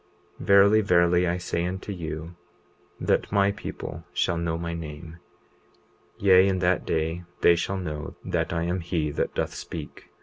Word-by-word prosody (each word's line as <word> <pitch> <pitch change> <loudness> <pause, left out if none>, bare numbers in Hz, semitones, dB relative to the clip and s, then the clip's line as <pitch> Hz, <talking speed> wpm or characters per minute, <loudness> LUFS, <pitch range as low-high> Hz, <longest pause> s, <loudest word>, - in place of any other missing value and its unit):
20:39 - - -7
Verily, 100 +2 +6
verily, 90 -2 +3
I 85 +1 0
say 90 -1 -2
unto 95 +3 -4
you, 80 -2 -6 0.6
that - - 0
my 100 0 +3
people 85 -4 -7
shall 85 - +1
know 85 -1 -1
my 85 0 -4
name; 80 +1 -8 1.0
yea, 95 -1 +6
in 95 -1 +1
that 90 0 +1
day 80 +2 -1 0.2
they 85 - +6
shall 95 +3 -2
know 75 -5 -5
that - - -1
I 85 0 -1
am 90 +2 -1
he 85 -3 -2
that - - -2
doth - - -1
speak. 80 -3 -8
85 Hz, 165 wpm, -26 LUFS, 80-95 Hz, 1.0 s, Verily